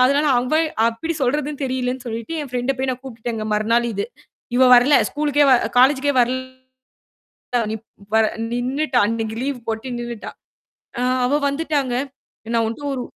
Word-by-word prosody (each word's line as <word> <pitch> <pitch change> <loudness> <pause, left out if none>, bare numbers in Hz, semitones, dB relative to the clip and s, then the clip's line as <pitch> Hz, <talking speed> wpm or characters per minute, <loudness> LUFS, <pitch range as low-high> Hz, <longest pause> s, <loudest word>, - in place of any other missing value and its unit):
அதனால 280 +3 +3
அவன் 310 +6 +1 0.2
எப்படி 320 +9 -3
சொல்றதுன்னு 290 +3 -1
தெரியலைன்னு 255 -1 -2
சொல்லிட்டு, 230 +5 -5
என் 280 - -8
ஃப்ரெண்ட 250 +2 0
போய் 265 - 0
நான் 250 - -8
கூப்ட்டேங்க 230 -3 -5
மறுநாள் 230 +3 +2
இது. 200 +1 -2 0.5
இவ 260 - +4
வரல. 250 +4 +5 0.2
ஸ்கூலுக்கே 290 -1 +2
வ - - +7 0.3
காலேஜ்க்கே 270 +2 +4
வரல 260 +1 -3 1.0
நிப் 220 0 -6 0.3
வர 220 0 +5 0.3
நின்னுட்டா. 255 +3 -1
அன்னைக்கு 225 0 -2
லீவு 275 -2 -2
போட்டு 225 +3 -3
நின்னுட்டா. 240 -2 -6 0.7
அ - - 0 0.2
அவ 285 +4 +2
வந்துட்டாங்க. 280 -3 -1 0.6
நான் 230 -1 +3
உன்ட்ட 230 +6 -6
ஒரு 255 - -3
255 Hz, 145 wpm, -21 LUFS, 235-280 Hz, 1.0 s, வ